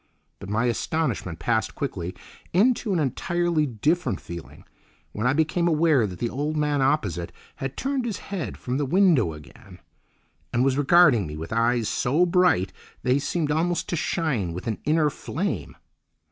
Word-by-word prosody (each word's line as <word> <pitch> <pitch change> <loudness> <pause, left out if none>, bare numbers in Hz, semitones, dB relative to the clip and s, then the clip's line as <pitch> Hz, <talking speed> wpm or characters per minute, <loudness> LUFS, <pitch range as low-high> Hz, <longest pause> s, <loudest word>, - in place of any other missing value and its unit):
But 100 - -8
my 110 +4 +1
astonishment 120 - -1
passed 110 +4 -1
quickly 90 -10 -4 0.4
into 225 +3 +3
an 185 - +2
entirely 165 +3 0
different 130 - 0
feeling 85 -1 -10 0.5
when 110 +4 -1
I 130 - +3
became 160 +3 +1
aware 155 -7 +3
that 90 -2 -8
the 120 - -1
old 145 +5 -2
man 150 -2 +1
opposite 105 - 0 0.3
had 135 0 -5
turned 270 -2 -1
his 220 -5 -2
head 195 -4 -5
from 130 +2 -3
the 145 - 0
window 170 - +3
again, 75 -2 -14 0.7
and 120 - +2
was 135 -1 +2
regarding 145 - +5
me 75 0 -7
with 80 +6 -6
eyes 115 0 +2
so 145 +11 +2
bright 175 - +2 0.3
they 125 +2 +3
seemed 150 +1 -1
almost 170 +3 0
to - - 0
shine 140 - -1
with 90 - -6
an 115 -3 -2
inner 150 -1 +3
flame. 185 +8 -4
140 Hz, 160 wpm, -25 LUFS, 110-170 Hz, 0.7 s, regarding